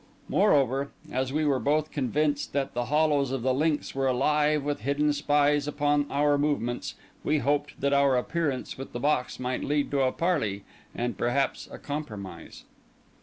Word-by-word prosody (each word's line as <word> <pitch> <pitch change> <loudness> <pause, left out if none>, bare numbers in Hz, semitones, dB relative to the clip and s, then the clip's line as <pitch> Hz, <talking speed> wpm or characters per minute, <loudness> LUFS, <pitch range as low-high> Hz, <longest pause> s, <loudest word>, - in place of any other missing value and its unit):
Moreover, 140 - +3 0.2
as 130 0 -1
we 155 +2 0
were 140 -3 +2
both 150 +3 +1
convinced 145 +2 -1
that 140 -1 -1
the 120 0 -1
hollows 150 -1 +2
of 130 -2 -3
the 130 0 +2
links 150 +2 0
were 135 0 0
alive 150 +3 +2
with 145 0 -2
hidden 145 +5 +1
spies 145 0 +2
upon 145 0 +1
our 145 0 +2
movements, 140 -5 -1 0.3
we 155 - +2
hoped 145 +2 -1
that 140 +1 +1
our 140 -2 +4
appearance 140 -1 -2
with 135 - -8
the 120 - -3
box 140 -1 0
might 125 0 -2
lead 145 0 0
to 140 -1 +1
a 130 -1 +3
parley, 130 - -1 0.3
and, 120 -4 -3
perhaps, 135 +3 0
a - - -7
compromise. 105 - -7
140 Hz, 170 wpm, -27 LUFS, 130-150 Hz, 0.3 s, our